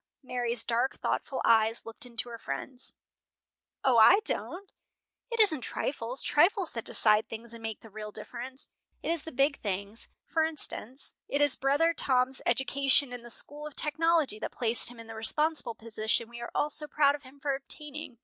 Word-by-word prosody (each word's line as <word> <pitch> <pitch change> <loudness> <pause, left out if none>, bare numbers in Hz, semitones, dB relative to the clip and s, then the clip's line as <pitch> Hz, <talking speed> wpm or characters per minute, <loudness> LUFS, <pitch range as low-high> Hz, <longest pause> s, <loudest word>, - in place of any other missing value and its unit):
Mary's 240 -2 -1
dark, 240 +3 0
thoughtful 265 - -2
eyes 225 0 +3
looked 230 +4 +1
into 235 0 +1
her 230 -1 -8
friend's. 260 +2 -6 0.9
"O, 250 -3 +4
I 365 - +8
don't! 390 -2 -4 0.6
It 465 -1 -4
isn't 350 - +4
trifles, 250 0 -1
trifles, 365 +4 +3
that 230 - -6
decide 215 0 +3
things 230 +1 -7
and 230 - -10
make 225 -1 -5
the 225 - -13
real 210 0 -7
difference. 260 +5 -7 0.4
It - - -1
is 335 -3 -1
the 320 - -7
big 275 +3 +1
things. 200 +2 -5 0.2
For 320 - 0
instance, 290 -4 -3
it 285 - -1
is 290 -2 +4
brother 290 +5 +2
Tom's 260 -3 +1
education 270 +1 +2
in 245 - -7
the 240 - -12
school 295 +5 -2
of 300 - -12
technology 310 -6 +2
that - - -4
placed 230 -1 +5
him 240 -1 -12
in 230 - -10
the 225 - -9
responsible 235 +3 0
position 225 +1 -2
we 235 0 -10
are 235 - -5
all 300 - +1
so 300 0 -3
proud 285 -1 +3
of 290 - -6
him 270 0 -16
for 280 0 -1
obtaining." 290 0 -5
260 Hz, 185 wpm, -29 LUFS, 230-295 Hz, 0.9 s, I